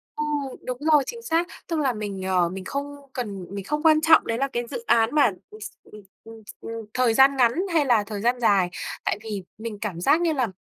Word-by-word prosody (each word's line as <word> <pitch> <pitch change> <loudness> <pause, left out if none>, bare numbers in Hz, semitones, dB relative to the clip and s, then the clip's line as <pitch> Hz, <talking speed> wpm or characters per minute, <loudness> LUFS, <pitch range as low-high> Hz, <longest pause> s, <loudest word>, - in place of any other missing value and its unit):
Ừ, 300 - -2 0.4
đúng 250 -1 -3 0.2
rồi, 290 -2 +6
chính 470 -1 -6
xác. 345 -5 0 0.2
Tức 330 -3 -1
là 265 -4 +1
mình, 205 -3 -5
ờ, 180 -2 +1
mình 185 +1 -7
không 285 +1 -4 0.2
cần 200 -7 -5
mình 200 -1 -5
không 300 +2 -2
quan 310 -1 +5
trọng 320 0 +5
đấy 230 0 -1
là 275 +1 0
cái 240 -2 -3
dự 470 - -6
án 225 +4 +3
mà, 285 -7 +5 0.2
ừm, 215 - -13
s - - -6
ừm, 210 - -14 0.2
ừm, 225 -1 -12 0.2
ừm, - - -7 0.2
thời 250 -3 +2
gian 270 +2 +5
ngắn 235 -2 +4 0.2
hay 310 -4 +3
là 230 -5 +3
thời 210 -2 -5
gian 240 +3 +1
dài. 195 -6 +3 0.4
Tại - - 0
vì 210 -4 -5
mình 215 -2 -6
cảm 185 -6 -4
giác 315 - +3
như 335 -2 +2
là, 255 -5 0
240 Hz, 240 wpm, -24 LUFS, 210-285 Hz, 0.4 s, rồi